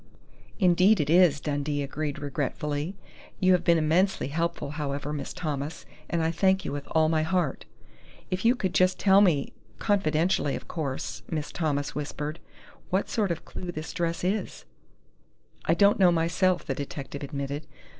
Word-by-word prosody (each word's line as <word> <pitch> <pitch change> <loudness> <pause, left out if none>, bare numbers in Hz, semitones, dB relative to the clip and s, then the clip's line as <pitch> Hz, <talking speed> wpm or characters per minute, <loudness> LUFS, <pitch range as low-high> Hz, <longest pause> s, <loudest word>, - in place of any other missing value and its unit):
"Indeed 185 +2 +4
it 150 0 0
is," 170 -4 +5
Dundee 145 0 -2
agreed 145 +1 -3
regretfully. 145 +3 -3 0.4
"You 185 0 +4
have 180 - +3
been 170 -1 +4
immensely 165 +2 +2
helpful, 170 -1 -2
however, 145 -1 -3
Miss 140 -2 -4
Thomas, 150 -1 -4 0.2
and 170 -1 0
I 160 - +1
thank 190 +2 +2
you - - -2
with 145 0 -5
all 160 -1 +3
my 160 0 +2
heart." 165 -3 -1 0.7
"If 185 0 -1
you 235 +2 +5
could 190 -7 -2
just 185 0 +3
tell 195 0 +5
me 165 -9 +2 0.2
confidentially, 170 -6 +1
of - - -8
course," 145 -6 -4
Miss 155 -3 -3
Thomas 145 -4 -1
whispered, 150 +2 -4 0.5
"what 190 +2 0
sort 210 -4 +1
of 170 -2 -3
clue 180 -1 -6
this 155 -1 -6
dress 170 0 -2
is 190 - -2 0.5
" - - -34
"I 165 - +3
don't 200 +4 +4
know, 180 -2 +6
myself!" 170 +2 +1
the 135 - -1
detective 140 0 -6
admitted. 140 +2 -4
160 Hz, 165 wpm, -27 LUFS, 145-185 Hz, 0.7 s, know